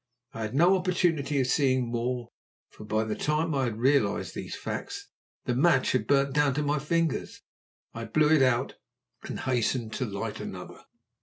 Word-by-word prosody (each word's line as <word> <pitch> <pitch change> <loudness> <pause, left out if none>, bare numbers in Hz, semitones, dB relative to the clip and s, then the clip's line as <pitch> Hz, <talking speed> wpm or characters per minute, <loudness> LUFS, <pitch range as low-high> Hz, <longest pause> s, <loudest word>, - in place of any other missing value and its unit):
I 115 - -6
had 110 +3 -4
no 175 +6 +5
opportunity 175 -6 +1
of 130 - +2
seeing 130 -2 +1
more, 120 0 -2 0.4
for 105 - -12
by 110 +1 0
the 110 -1 -2
time 155 +5 0
I 135 -2 +1
had 115 -3 -3
realized 125 -4 +1
these - - -6
facts - - -6 0.4
the 125 - 0
match 135 +1 +3
had 130 - 0
burnt 140 -1 +2
down 145 -3 +2
to 150 - 0
my 145 +1 0
fingers. 165 +1 -1 0.5
I 115 0 -5
blew 155 +3 +2
it 155 - +5
out 130 0 +1 0.4
and - - -6
hastened 120 -2 -1
to 130 - -2
light 100 -1 -4
another. - - -8
135 Hz, 175 wpm, -28 LUFS, 120-150 Hz, 0.5 s, no